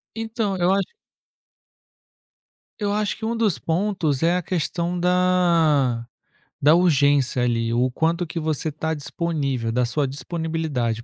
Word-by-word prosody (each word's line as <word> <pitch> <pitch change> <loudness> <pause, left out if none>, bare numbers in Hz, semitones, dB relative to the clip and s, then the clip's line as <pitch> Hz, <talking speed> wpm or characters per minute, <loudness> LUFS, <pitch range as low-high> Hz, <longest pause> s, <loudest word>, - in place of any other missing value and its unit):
Então, 225 -3 -2
eu 175 +1 +2
acho 195 0 0 1.9
eu 205 -2 -1
acho 210 0 -1
que 220 - -8
um 230 +1 -1
dos 210 - +1
pontos 165 -2 -1
é 170 +2 +3
a 180 - -1
questão 175 +1 -2
da 170 -9 +2 0.6
da 150 +3 +6
urgência 145 -7 +3
ali, 115 -1 0
o 125 +2 +1
quanto 165 +6 0
que 165 +1 -5
você 155 0 -1
está 160 +2 -3
disponível, 140 -6 -2
da 125 +2 +1
sua 135 +4 -1
disponibilidade, 140 -4 -3
160 Hz, 135 wpm, -23 LUFS, 135-180 Hz, 1.9 s, da